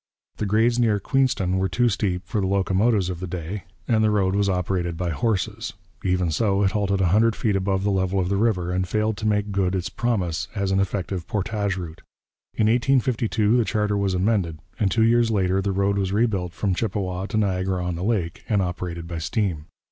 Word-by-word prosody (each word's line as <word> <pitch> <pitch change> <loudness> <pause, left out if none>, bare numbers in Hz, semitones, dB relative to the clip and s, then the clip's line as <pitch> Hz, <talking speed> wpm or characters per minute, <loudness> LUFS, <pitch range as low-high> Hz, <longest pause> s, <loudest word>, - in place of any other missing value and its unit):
The 105 - -2
grades 115 +4 +2
near 110 -4 +3
Queenston 100 -7 +1
were 95 0 0
too 120 +7 +2
steep 100 -4 -1
for 105 - -1
the 95 - 0
locomotives 95 +1 +2
of 85 - -6
the 95 - -4
day, 90 +3 -5 0.2
and 110 -3 +3
the 110 - +4
road 100 -3 +2
was 100 0 +2
operated 90 -2 -1
by 90 -1 -1
horses; 105 -2 -1 0.3
even 90 -2 +1
so, 100 +1 +1
it 95 - +2
halted 100 -1 0
a 90 - +3
hundred 110 +4 +3
feet 105 -3 0
above 95 0 0
the 100 - +1
level 95 0 +1
of 90 - 0
the 100 - 0
river, 95 -5 +1
and 90 0 -1
failed 110 +3 0
to 110 - -2
make 105 -1 0
good 95 -1 0
its 90 -1 -3
promise 95 -6 -1
as 100 -2 -1
an 95 - +2
effective 95 -2 -2
portage 100 -1 -1
route. 85 -3 -7 0.5
In 110 - +2
1852 120 -2 +2
the 120 - +3
charter 105 -1 0
was 100 -2 0
amended, 90 -4 +1 0.2
and 105 -4 +2
two 110 +3 +2
years 115 0 +4
later 95 -3 +1
the 100 +1 -1
road 100 +1 +1
was 95 -1 -1
rebuilt 100 -5 0
from 95 +3 -1
Chippawa 95 -1 -2
to 110 - -2
Niagara 95 -3 0
on 90 - -1
the 85 +2 -4
Lake, 95 -6 -1
and 105 -3 +2
operated 90 -2 -3
by 85 -1 -4
steam. 85 -3 -2
100 Hz, 210 wpm, -24 LUFS, 90-110 Hz, 0.5 s, the